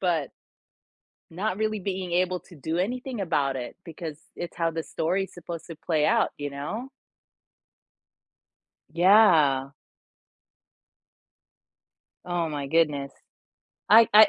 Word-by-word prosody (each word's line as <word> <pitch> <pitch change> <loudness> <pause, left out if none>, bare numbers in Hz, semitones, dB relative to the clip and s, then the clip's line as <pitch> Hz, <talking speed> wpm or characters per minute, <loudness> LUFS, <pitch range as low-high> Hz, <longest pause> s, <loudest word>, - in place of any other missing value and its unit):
but 165 -6 0 1.0
not 190 +4 -2
really 215 0 0
being 185 -1 -3
able 180 0 +1
to 175 - -16
do 160 +4 -3
anything 245 +4 -2
about 145 -7 +1
it 125 -2 -6
because 160 -2 -7 0.2
it's 175 - -6
how 165 -1 +1
the 165 0 -2
story 175 +5 -1
is - - -14
supposed 170 -1 -7
to 165 - -8
play 155 -1 0
out, 230 +1 +3
you 145 0 -3
know. 150 - -5 2.0
Yeah. 165 -8 +5 2.5
Oh 175 -2 -1
my 145 -2 -4
goodness. 145 -3 +1 0.8
I 225 +1 +8
I 215 0 +10
170 Hz, 120 wpm, -26 LUFS, 150-195 Hz, 2.5 s, I